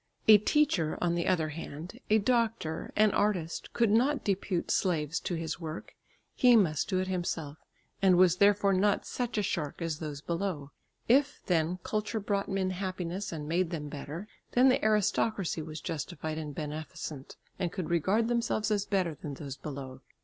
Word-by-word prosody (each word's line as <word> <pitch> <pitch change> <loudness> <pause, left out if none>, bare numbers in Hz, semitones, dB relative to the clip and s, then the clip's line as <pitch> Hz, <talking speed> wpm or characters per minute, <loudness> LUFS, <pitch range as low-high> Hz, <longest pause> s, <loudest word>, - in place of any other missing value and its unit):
A 215 -1 +9
teacher, 210 - +2
on 175 -1 +1
the 170 0 -1
other 165 -4 +2
hand, 165 +6 -8
a 215 - +5
doctor, 225 -7 0
an 215 0 +5
artist, 180 -7 -1
could 230 -3 +2
not 265 +6 +3
depute 195 -3 -1
slaves 165 -4 +1
to 175 - -3
his 165 0 -4
work; 160 -1 -7 0.4
he 245 -1 +6
must 165 -9 +2
do 190 - +1
it 185 0 0
himself, 165 -5 -3 0.4
and 185 -2 +5
was 180 -1 +5
therefore 200 0 +4
not 200 +2 +2
such 245 -3 -3
a 210 - +2
shark 155 -7 -2
as 165 -3 -3
those 150 -3 -5
below. 170 -3 -3 0.4
If, 280 +4 +3
then, 170 0 +1
culture 215 +1 -2
brought 200 -1 -1
men 190 -1 0
happiness 185 0 -4
and 150 -3 -5
made 170 +2 +1
them 150 -4 -4
better, 150 +6 -6 0.3
then 255 +2 +6
the 255 - +2
aristocracy 210 -4 +1
were 155 0 -8
justified 160 0 -4
and 150 -2 -6
beneficent, 150 -2 -6 0.2
and 175 -3 -1
could 180 -4 -4
regard 190 +7 +2
themselves 230 -2 0
as 205 -1 0
better 185 -5 +1
than 145 -1 -7
those 140 -1 -6
below. 135 -2 -7
180 Hz, 170 wpm, -30 LUFS, 155-210 Hz, 0.4 s, A